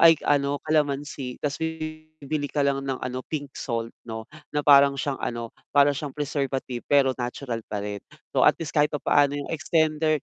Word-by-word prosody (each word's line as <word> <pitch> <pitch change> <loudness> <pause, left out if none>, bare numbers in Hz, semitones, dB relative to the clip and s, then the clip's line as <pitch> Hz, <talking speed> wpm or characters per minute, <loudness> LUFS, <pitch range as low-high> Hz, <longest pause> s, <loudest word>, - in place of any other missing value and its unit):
ay 165 -1 +8
ano, 145 0 +2
kalamansi 145 -4 -1
tas 145 -1 -1
bibili 155 -2 -4
ka 145 - +1
lang 140 -1 +2
ng 135 -1 -2
ano, 125 0 -3
pink 145 -3 -4
salt 115 -2 -2 0.2
'no, 110 -1 -5 0.3
na 150 - +1
parang 140 -1 +7
siyang 140 0 -2
ano 115 -1 -4 0.2
para 145 0 +6
siyang 140 0 -4
preservative 135 -4 -3
pero 140 -2 +4
natural 125 0 -3
pa 105 -1 -4
rin. 105 0 -4 0.3
So - - +3
at - - +7
least 165 -3 -5
kahit 150 -1 +4
papaano 145 0 +3
yung 145 -1 -4
extender 155 -2 +1
140 Hz, 175 wpm, -25 LUFS, 130-150 Hz, 0.3 s, ay